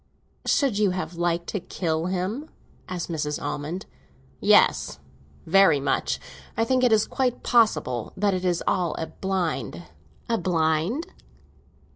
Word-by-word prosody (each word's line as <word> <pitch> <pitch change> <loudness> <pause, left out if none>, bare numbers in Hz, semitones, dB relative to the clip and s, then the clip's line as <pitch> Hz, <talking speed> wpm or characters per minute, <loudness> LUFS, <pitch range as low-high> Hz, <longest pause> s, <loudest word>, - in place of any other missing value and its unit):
"Should 265 -9 +2
you 210 -2 +4
have 180 -1 -3
liked 170 0 0
to 205 - -2
kill 165 -2 -2
him?" 190 - -2 0.4
asked 180 -2 -3
Mrs. 150 -3 -2
Almond. 165 +7 -4 0.5
"Yes, - - +4 0.5
very 175 -3 +5
much. 140 - 0 0.4
I 225 - +3
think 255 +1 +2
it 250 - +4
is 220 -1 +4
quite 255 -2 -1
possible 210 - +2
that 200 0 +2
it 185 0 -2
is 175 -2 0
all 175 -4 +1
a 160 - -3
blind." 160 - -3 0.4
"A 230 -1 +1
blind?" 170 - +1
180 Hz, 135 wpm, -25 LUFS, 160-215 Hz, 0.5 s, very